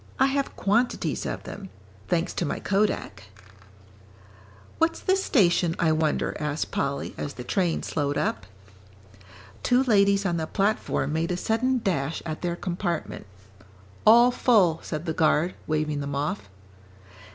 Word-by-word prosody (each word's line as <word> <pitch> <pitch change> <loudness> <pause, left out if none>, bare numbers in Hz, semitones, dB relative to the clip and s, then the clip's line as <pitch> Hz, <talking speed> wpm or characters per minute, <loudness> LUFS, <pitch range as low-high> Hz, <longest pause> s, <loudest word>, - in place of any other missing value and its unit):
I 265 - +6
have 275 0 -1
quantities 230 +5 0
of - - -4
them 195 -1 -8 0.4
thanks 170 -1 0
to - - -2
my 155 - -2
kodak." 195 - -1 1.5
"What's 330 0 +2
this 380 +1 +1
station, 175 - +3
I 165 -2 +2
wonder?" 155 -1 0
asked 150 0 -2
Polly, 140 0 -2
as 145 - -4
the 125 - -7
train 175 +5 0
slowed 145 -1 -1
up. 100 -3 -2 1.1
Two 250 +1 +3
ladies 200 -4 +3
on 175 -3 0
the 160 -1 -2
platform 195 -8 0
made 165 +2 0
a 180 - -1
sudden 245 +6 0
dash 160 -5 -1
at 155 -1 -5
their 175 -1 -1
compartment. 175 - -4 0.8
"All 235 +3 +7
full," 195 -11 +3
said 155 +1 -5
the 160 - -1
guard, 160 +2 +2
waving 155 -1 -1
them 140 0 -4
off. 140 -8 -3
170 Hz, 140 wpm, -26 LUFS, 155-210 Hz, 1.5 s, All